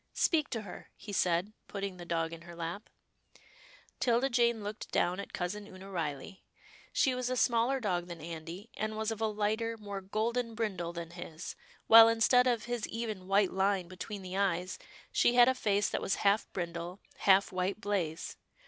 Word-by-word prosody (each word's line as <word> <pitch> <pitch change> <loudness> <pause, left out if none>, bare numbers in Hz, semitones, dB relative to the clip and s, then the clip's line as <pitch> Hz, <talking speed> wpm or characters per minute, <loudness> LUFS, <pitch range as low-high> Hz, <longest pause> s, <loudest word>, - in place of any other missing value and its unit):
" - - -46
Speak 310 -4 +2
to 225 -3 -3
her," 195 - -10
he 205 - -9
said, 180 +2 +1
putting 195 -2 -4
the 175 - -8
dog 165 -1 -1
in 165 - -8
her 170 0 -11
lap. 170 +5 -5 1.1
'Tilda 245 +2 +2
Jane 235 -2 +2
looked 210 +1 -6
down 180 +2 +1
at 200 - -6
Cousin 200 +3 -4
Oonah 190 0 -11
Riley. 160 +2 -4 0.5
She 265 - +3
was 250 0 -2
a 255 - -1
smaller 240 +3 +3
dog 180 -6 -1
than 170 -1 -7
Andy, 165 +6 -8
and 215 0 -3
was 220 0 -1
of 225 0 -5
a 220 - +3
lighter, 215 +2 -1
more 200 -2 -6
golden 225 +4 -1
brindle 195 -7 -2
than 170 -1 -6
his, 170 -2 -7 0.3
while 225 0 +10
instead 240 +2 +4
of 235 -3 +1
his 240 -3 -2
even 215 -5 -4
white 195 0 +3
line 190 -1 +1
between 185 +3 -7
the 185 0 -6
eyes, 185 -2 0 0.3
she 240 - +3
had 245 0 +8
a 260 - +5
face 205 -5 +1
that - - -2
was 195 - 0
half 200 +2 +3
brindle, 175 +1 -4 0.2
half 195 0 +4
white 185 +2 -1
blaze. 185 -6 -2
200 Hz, 185 wpm, -32 LUFS, 180-225 Hz, 1.1 s, while